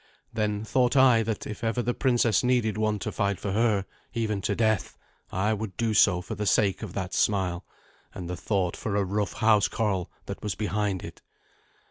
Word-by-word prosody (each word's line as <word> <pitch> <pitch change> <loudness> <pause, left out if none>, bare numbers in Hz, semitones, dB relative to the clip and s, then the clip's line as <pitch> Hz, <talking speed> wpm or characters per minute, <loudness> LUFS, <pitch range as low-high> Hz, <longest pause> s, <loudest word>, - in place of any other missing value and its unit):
Then 105 -1 -1
thought 125 +2 +2
I 130 -4 +6
that 110 -1 -3
if 105 +3 -7
ever 115 +2 0
the 120 - 0
princess 120 -4 +2
needed 120 -4 +2
one 110 0 0
to - - -4
fight 100 -2 -1
for 100 - -3
her, 105 -2 +2 0.3
even 110 -3 -1
to 100 - -1
death, 110 -3 0 0.3
I 105 +4 +1
would 105 -2 -5
do 115 -2 0
so 95 -3 +4
for - - -6
the 105 0 -3
sake 100 -2 +2
of 105 -5 -6
that 95 -2 -4
smile 95 -3 0 0.5
and 90 - -7
the 90 - -3
thought 90 -1 -1
for 105 -3 -3
a 100 -1 +2
rough 100 +1 -1
housecarl 105 -3 +2 0.2
that 100 - -6
was 105 -4 -3
behind 105 -3 -1
it. - - -9
105 Hz, 190 wpm, -27 LUFS, 100-110 Hz, 0.5 s, I